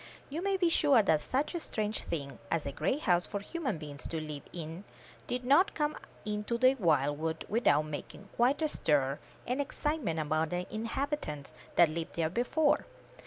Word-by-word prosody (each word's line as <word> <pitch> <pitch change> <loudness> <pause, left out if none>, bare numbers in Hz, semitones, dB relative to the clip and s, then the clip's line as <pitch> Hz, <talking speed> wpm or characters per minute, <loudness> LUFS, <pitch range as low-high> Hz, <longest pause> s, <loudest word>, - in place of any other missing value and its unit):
You 315 +4 -2
may 390 0 +1
be 360 -2 +3
sure 285 -8 +5
that 160 -5 +3
such 275 +6 -1
a 345 - -1
strange 215 -7 -3
thing 140 -5 -4
as 165 +2 0
a 140 - -2
great 190 - 0
house 175 - +3
for 205 - -3
human 265 - -3
beings 145 -2 -7
to 165 - -3
live 150 -2 -5
in 165 +2 -6 0.4
did 250 0 -2
not 340 +10 +5
come 300 -1 0 0.3
into 210 +2 -1
this 255 +2 +4
wild 145 -5 +2
wood 160 0 -2
without 155 -10 +3
making 155 +6 -7
quite 260 +6 +3
a - - +4
stir 140 - +1 0.3
and 250 +4 0
excitement 285 - -1
among 155 +1 +1
the 180 +1 -2
inhabitants 225 - -3 0.2
that 170 - +7
lived 165 +1 -4
there 165 -1 0
before. 285 - +2
200 Hz, 180 wpm, -32 LUFS, -, 0.4 s, that